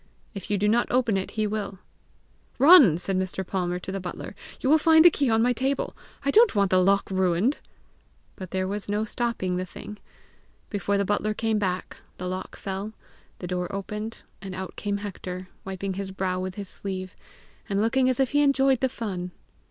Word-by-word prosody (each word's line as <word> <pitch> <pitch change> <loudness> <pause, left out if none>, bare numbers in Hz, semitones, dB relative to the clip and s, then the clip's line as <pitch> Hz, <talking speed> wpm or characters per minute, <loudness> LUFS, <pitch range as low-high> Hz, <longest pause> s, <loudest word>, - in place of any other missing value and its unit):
If 195 - -8
you 205 - +1
do 205 +2 +1
not 235 +3 +3
open 240 -4 +2
it, 190 0 -2
he 215 - +2
will!" 205 -2 -3 0.8
"Run," 275 - +8
said 185 +1 -1
Mr. 190 0 -3
Palmer 180 -1 -1
to 180 +1 -6
the 195 - -3
butler; 180 -1 -6 0.3
"you - - -2
will 310 +3 +6
find 320 +1 +6
the 350 - +10
key 280 -4 +1
on 225 0 +3
my 245 +1 +3
table! 265 +3 -1 0.3
I 280 - +3
don't 450 - +5
want 200 -2 +2
the 185 0 +5
lock 195 +1 +2
ruined!" 190 - +1 0.8
But 185 -3 -8
there 185 0 -1
was 205 +1 -4
no 210 +1 0
stopping 220 -6 -2
the 185 - -1
thing! 210 +3 -9 0.7
Before 200 -1 0
the 200 - +1
butler 210 +1 0
came 220 -1 0
back, 185 -2 -2 0.2
the 180 - -5
lock 185 +1 -5
fell, 195 +2 -5 0.4
the - - -7
door 180 0 -3
opened, 210 +3 -5 0.2
and 190 -2 -6
out 185 -1 -6
came 205 -1 -2
Hector, 185 -2 -6 0.2
wiping 190 0 -4
his 195 +1 -4
brow 190 -1 -2
with 185 0 -4
his 200 -2 -6
sleeve, 185 -1 -6 0.5
and 200 -1 0
looking 255 +4 +2
as 255 - 0
if 265 -2 +2
he 290 - +3
enjoyed 270 -2 +3
the 260 - +1
fun. 185 -7 -4
200 Hz, 200 wpm, -26 LUFS, 185-230 Hz, 0.8 s, the